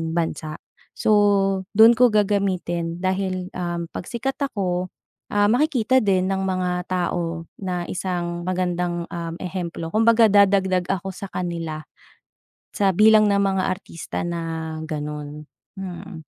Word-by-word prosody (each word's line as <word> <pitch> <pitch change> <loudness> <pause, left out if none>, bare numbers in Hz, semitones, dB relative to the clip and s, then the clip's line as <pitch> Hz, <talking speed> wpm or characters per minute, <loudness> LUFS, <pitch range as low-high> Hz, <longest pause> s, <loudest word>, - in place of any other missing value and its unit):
bansa. 160 -2 -2 0.4
So 215 - +1 0.7
dun 225 +2 +9
ko 250 +1 +6
gagamitin 185 -5 0
dahil, 185 0 -1
um, 175 -1 -3
pagsikat 240 +8 -3
ako, 185 -8 -1 0.4
ah, 205 0 +3
makikita 260 0 +3
din 185 -2 +2
ng 190 0 0
mga 180 -1 -1
tao 170 -2 -2 0.2
na 180 -2 -2
isang 175 -2 -3
magandang, 175 -1 -1
um, 170 -1 -4
ehemplo 170 -2 -5
kumbaga 225 +1 +5
dadagdag 195 -3 +3
ako 190 0 -3
sakanila 170 -5 -4 0.9
sa 195 -2 +1
bilang 215 +1 +6
ng 200 -1 +3
mga 190 -1 +1
artista 185 -3 -5
na 165 -2 -4
ganun, 150 -1 -6 0.3
mm. 180 -2 -7
185 Hz, 120 wpm, -23 LUFS, 170-200 Hz, 0.9 s, dun